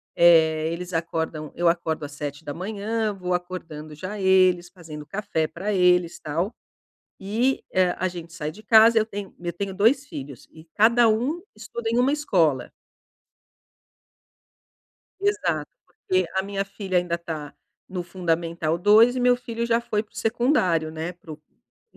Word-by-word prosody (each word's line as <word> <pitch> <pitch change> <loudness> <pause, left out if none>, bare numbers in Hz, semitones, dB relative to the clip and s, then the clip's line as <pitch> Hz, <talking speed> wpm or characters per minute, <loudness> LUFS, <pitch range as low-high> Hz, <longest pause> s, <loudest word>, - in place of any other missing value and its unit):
eh, 160 -2 +5
eles 180 +1 -6
acordam 160 -2 -3
eu 175 0 +1
acordo 160 -3 -1
às 145 - -9
07:00, 200 +10 -3
vou 180 -2 -3
acordando 170 -4 -5
já 185 +6 -6
eles, 185 -2 +3
fazendo 160 -5 -10
café 195 -2 -2
pra 195 +7 -4
eles, 180 -2 +3
tal. 165 +7 -2 0.7
E 230 +7 0
hã, 185 -1 +3
a 185 - 0
gente 170 -2 -9
sai 155 -4 -4
de 215 +6 -14
casa 225 +1 +6
eu 215 - +2
tenho 200 -2 -7
eu 175 -1 -3
tenho 195 +1 -4
2 250 +8 +3
filhos 135 - -9
e 160 0 -14
cada 235 +2 +5
um 250 +10 0
estuda 225 +1 -6
em 235 - +1
uma 265 +3 +3
escola. 165 - +1 2.5
Exato. 170 - 0 0.2
Porque 185 +1 -1
a 190 - +2
minha 195 0 -3
filha 195 -2 -2
ainda 175 -1 0
tá 155 -4 -7 0.3
no 185 -2 -4
fundamental 170 -2 -1
2 215 +7 +5
e - - -1
meu 245 0 +4
filho 235 -1 -4
já 230 0 +2
foi 210 -3 -1
para 215 - -21
o - - -23
secundário, 220 - +1
né. 160 +3 -5
Para 165 -2 -13
o 150 - -12
para 150 - -42
180 Hz, 160 wpm, -24 LUFS, 165-215 Hz, 2.5 s, casa